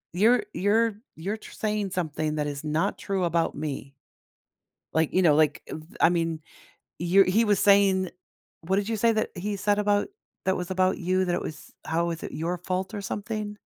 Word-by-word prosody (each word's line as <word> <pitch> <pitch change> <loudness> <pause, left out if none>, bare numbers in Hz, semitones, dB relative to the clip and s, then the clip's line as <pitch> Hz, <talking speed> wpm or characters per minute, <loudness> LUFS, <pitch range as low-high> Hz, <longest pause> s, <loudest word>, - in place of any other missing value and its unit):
You're 220 +4 +4
you're 215 +2 +2 0.2
you're 195 +7 -3
tr - - -13
saying 210 -2 -1
something 155 -3 -2
that 150 -1 -1
is 145 0 -4
not 155 +6 0
true 195 -2 -1
about 170 -1 +1
me. 140 -2 -5 1.0
Like, 160 +1 +1
you 185 - +4
know, 155 -4 +5
like, 150 -2 +3
eh, - - -6 0.3
I - - +7
mean, 165 -2 0 0.6
you're 180 +3 +5
he 215 +5 +3
was 205 -2 +3
saying 195 -2 +4 0.5
What 190 +4 0
did 205 +2 0
you 225 - 0
say 230 +2 +3
that 220 - -1
he 200 +3 -3
said 205 +1 +1
about 205 0 +2 0.4
that 190 - +2
was 180 0 -5
about 185 0 +2
you, 185 +1 +1
that 175 -1 0
it - - -1
was 155 - -8
how 165 +2 0
was 170 -1 -4
it - - -6
your 170 +3 -2
fault 185 +3 -3
or 205 - -3
something? 210 +1 -4
185 Hz, 195 wpm, -26 LUFS, 165-205 Hz, 1.0 s, I